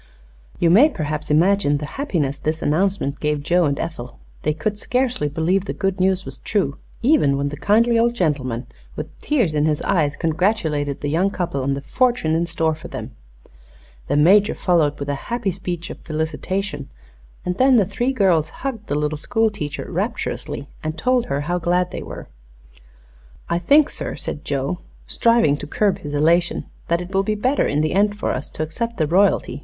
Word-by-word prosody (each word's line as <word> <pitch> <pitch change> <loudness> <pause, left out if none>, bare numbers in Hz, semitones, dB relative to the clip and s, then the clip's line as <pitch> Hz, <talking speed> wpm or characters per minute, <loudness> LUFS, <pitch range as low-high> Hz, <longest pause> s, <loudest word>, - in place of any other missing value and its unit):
You 170 - +3
may 250 - +7
perhaps 155 - -4
imagine 160 -1 +3
the 150 - -5
happiness 160 - -2
this 155 +1 -2
announcement 160 -2 0
gave 150 -1 -1
Joe 175 +2 +3
and 140 -1 0
Ethel. 125 -7 -5 0.2
They - - +1
could 205 +7 -3
scarcely 250 - 0
believe 170 +6 0
the - - -3
good 195 -1 -1
news 190 0 +2
was - - -7
true, 190 -10 -1 0.2
even 190 - +4
when 140 0 -1
the 145 - -6
kindly 230 +7 +3
old 235 +1 +2
gentleman, 135 - -1 0.3
with - - -7
tears 240 - +1
in 150 0 +2
his 150 -1 +1
eyes, 155 -6 +1
congratulated 160 -4 0
the 145 - -2
young 175 +6 +2
couple 175 -8 -2
on 135 +1 0
the 140 - -5
fortune 245 - +1
in 170 +1 +1
store 160 -1 0
for 155 - -9
them. - - -7 1.0
The - - +1
Major 195 +7 +5
followed 165 -6 +2
with 140 - -4
a 145 - 0 0.2
happy 235 -5 0
speech 175 -1 -5
of - - -9
felicitation, 165 - -3 0.6
and 180 0 -2
then 260 0 +6
the 210 -5 +5
three 240 +7 -1
girls 180 - +2 0.2
hugged 230 -6 -3
the 145 - -1
little 150 0 -1
school 225 +5 +1
teacher 150 -7 -5
rapturously 140 - -3
and 155 +1 -4
told 250 +2 +1
her 140 +1 -1
how 175 +4 -1
glad 180 +1 +1
they - - -5
were. - - -8 1.2
"I 170 - +2
think, 285 - +4
sir," - - -4
said 150 - -5
Joe, 140 +5 -2 0.3
striving 230 -12 +3
to 145 - -7
curb 200 +5 +1
his 145 -1 -5
elation, 170 +4 +2 0.2
"that 170 +1 +1
it 180 +2 -8
will 195 - +3
be 215 +2 -1
better 255 +7 +1
in 145 +1 +1
the 155 - 0
end 205 +1 +2
for - - -1
us 130 - -3
to 155 - -2
accept 230 +9 -4
the 160 - +2
royalty. 180 -5 +2
170 Hz, 190 wpm, -21 LUFS, 150-205 Hz, 1.2 s, may